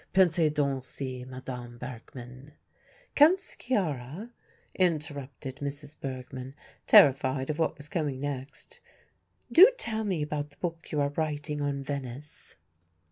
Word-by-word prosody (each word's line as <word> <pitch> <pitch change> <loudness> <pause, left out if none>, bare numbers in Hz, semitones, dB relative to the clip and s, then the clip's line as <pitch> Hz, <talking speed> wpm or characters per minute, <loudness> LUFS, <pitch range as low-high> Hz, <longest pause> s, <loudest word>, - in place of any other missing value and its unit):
Pensez 170 -4 +5
donc 140 -3 0
si 130 -1 -6
Madame 125 -2 -7
Bergmann 125 +2 -9 0.3
" - - -30
"Count 315 +6 +7
Sciarra," 190 - -3 0.4
interrupted 145 -6 -2
Mrs. 145 +1 -5
Bergmann, 130 0 -6 0.3
terrified 135 0 +6
of 150 - -6
what 160 - +1
was 145 - -8
coming 150 -6 -2
next, 140 0 -6 0.7
"do 385 +8 +10
tell 220 - -1
me 185 -7 0
about 150 -1 -3
the 145 - -24
book 165 -2 -5
you 150 - 0
are 140 0 +2
writing 150 0 -2
on 140 -1 -1
Venice." 140 +1 -6
145 Hz, 130 wpm, -29 LUFS, 130-160 Hz, 0.7 s, do